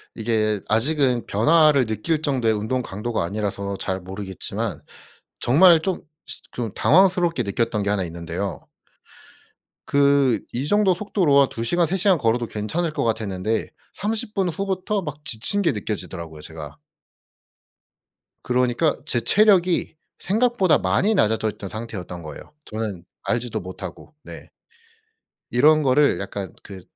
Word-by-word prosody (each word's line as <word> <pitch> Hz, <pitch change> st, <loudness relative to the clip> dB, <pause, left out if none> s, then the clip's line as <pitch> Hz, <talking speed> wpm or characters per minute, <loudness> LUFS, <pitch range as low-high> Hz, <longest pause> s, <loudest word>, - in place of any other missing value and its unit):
이게 110 Hz, -2 st, 0 dB
아직은 125 Hz, +2 st, +2 dB
변화를 150 Hz, +4 st, +4 dB
느낄 115 Hz, +9 st, -2 dB
정도의 130 Hz, -7 st, +1 dB
운동 110 Hz, +5 st, -1 dB
강도가 110 Hz, -1 st, -3 dB
아니라서 100 Hz, +1 st, -3 dB
잘 95 Hz, 0 st, -3 dB
모르겠지만 95 Hz, 0 st, -4 dB, 0.6 s
정말 165 Hz, +6 st, +6 dB
좀 190 Hz, +1 st, -2 dB, 0.3 s
시 -, -, -6 dB
좀 120 Hz, -2 st, -4 dB
당황스럽게 175 Hz, -5 st, +3 dB
느꼈던 105 Hz, +1 st, -1 dB
게 100 Hz, -, -1 dB
1 100 Hz, -2 st, 0 dB
있는데요. 85 Hz, +3 st, -5 dB, 1.2 s
그 140 Hz, -3 st, +3 dB
이 130 Hz, +4 st, -2 dB
정도 205 Hz, +1 st, +3 dB
속도로 175 Hz, -6 st, +2 dB
아 135 Hz, -, +2 dB
2 115 Hz, -, -5 dB
시간 175 Hz, +8 st, +2 dB
3 185 Hz, +5 st, -1 dB
시간 190 Hz, -1 st, +3 dB
걸어도 120 Hz, -2 st, 0 dB
괜찮을 155 Hz, +13 st, -2 dB
것 -, -, -2 dB
같았는데 110 Hz, -1 st, -1 dB, 0.2 s
30 215 Hz, +2 st, -3 dB
분 195 Hz, -4 st, 0 dB
후부터 195 Hz, +3 st, -2 dB
막 150 Hz, -3 st, -7 dB
지친 155 Hz, -, +3 dB
게 180 Hz, -, +2 dB
느껴지더라고요 85 Hz, -7 st, -5 dB
제가. 75 Hz, -2 st, -9 dB, 1.7 s
그러니까 125 Hz, +5 st, +1 dB
제 125 Hz, -6 st, +1 dB
체력이 185 Hz, -, +3 dB, 0.2 s
생각보다 215 Hz, -3 st, +2 dB
많이 215 Hz, +4 st, +1 dB
낮아져 110 Hz, -, +2 dB
있던 100 Hz, -1 st, -9 dB
상태였던 95 Hz, -6 st, -7 dB
거예요 75 Hz, -, -10 dB
저는 105 Hz, -5 st, -5 dB, 0.2 s
알지도 115 Hz, -2 st, -2 dB
못하고. 95 Hz, -, -9 dB
네. -, -, -10 dB, 1.0 s
이런 155 Hz, +5 st, +5 dB
거를 140 Hz, +2 st, +3 dB
약간 100 Hz, -1 st, -6 dB
그 95 Hz, -2 st, -10 dB
120 Hz, 285 characters per minute, -22 LUFS, 105-165 Hz, 1.7 s, 정말